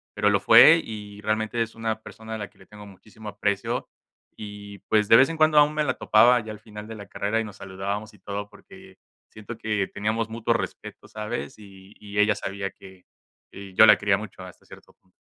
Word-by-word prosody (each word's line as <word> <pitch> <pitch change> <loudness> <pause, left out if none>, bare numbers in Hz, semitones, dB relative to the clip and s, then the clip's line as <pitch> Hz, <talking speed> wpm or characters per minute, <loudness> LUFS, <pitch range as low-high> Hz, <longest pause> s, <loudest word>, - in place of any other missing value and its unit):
pero 105 - +2
lo 100 -1 +2
fue, 125 +11 +7
y 105 -2 -9
realmente 110 +2 -1
es 115 0 -3
una 110 -1 -3
persona 110 0 -10
a - - -4
la 105 - -6
que - - -31
le 95 - -18
tengo 105 0 -13
muchísimo 105 +2 -12
aprecio 100 -1 -2 0.5
y, 100 -1 -10
pues, 105 -1 +2
de 115 - +7
vez 130 +5 +6
en 165 - -5
cuando 155 -1 +3
aún 150 +1 +4
me 155 0 0
la 130 -3 0
topaba 120 +3 +4
ya 110 0 -8
al 105 - -10
final 105 -1 -11
de 115 - -8
la 100 -2 -10
carrera, 105 +3 -2
y - - -1
nos 105 -2 -10
saludábamos 100 +3 -5
y 105 - -20
todo, 100 +2 -6
porque - - -16 0.3
siento 110 +2 -10
que 105 -3 -2
teníamos 110 +2 -2
mutuo 115 +1 -1
respeto, - - -6
¿sabes?, 110 +4 -6
y 100 -1 -15
y 105 -1 -9
ella 105 +1 +4
sabía 100 0 -5
que 95 -1 -16 0.5
que 100 -1 -11
yo - - +8
la - - +7
quería 100 -1 +2
mucho 105 -2 -10
hasta 90 - -14
cierto - - -16
punto. 95 - -36
105 Hz, 220 wpm, -24 LUFS, 100-110 Hz, 0.5 s, yo